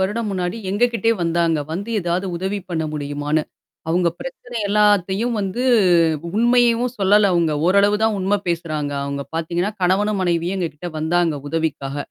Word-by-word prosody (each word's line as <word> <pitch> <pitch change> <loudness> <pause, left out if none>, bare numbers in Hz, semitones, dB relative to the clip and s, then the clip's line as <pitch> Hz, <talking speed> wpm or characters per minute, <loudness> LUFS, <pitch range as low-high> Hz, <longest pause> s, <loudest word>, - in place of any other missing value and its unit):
வருடம் 210 +3 -1
முன்னாடி, 180 +1 -2
எங்கக்கிட்டயே 230 +1 +1
வந்தாங்க. 170 -1 +1
வந்து 200 +7 -4
ஏதாவது 175 +2 -1
உதவி 190 +3 -2
பண்ண 160 -2 -1
முடியுமான்னு. 145 +1 -1 0.5
அவுங்க 175 +1 +2
பிரச்சனை 245 -2 -8
எல்லாத்தையும் 210 +2 +2
வந்து 195 +6 -2 0.7
உண்மையையும் 240 +2 +3
சொல்லல 200 +1 +4
அவுங்க. 170 -3 +2
ஓரளவு 200 +3 +4
தான் 220 -1 +2
உண்ம 195 +2 +1
பேசுறாங்க. 155 -4 -2
அவுங்க 140 0 -3
பார்த்தீங்கன்னா, 170 +5 -1
கணவனும் 195 +2 +2
மனைவியும் 175 +1 0
எங்கக்கிட்ட 170 0 -4
வந்தாங்க 165 0 +1
உதவிக்காக. 150 -4 -2
185 Hz, 135 wpm, -20 LUFS, 165-210 Hz, 0.7 s, சொல்லல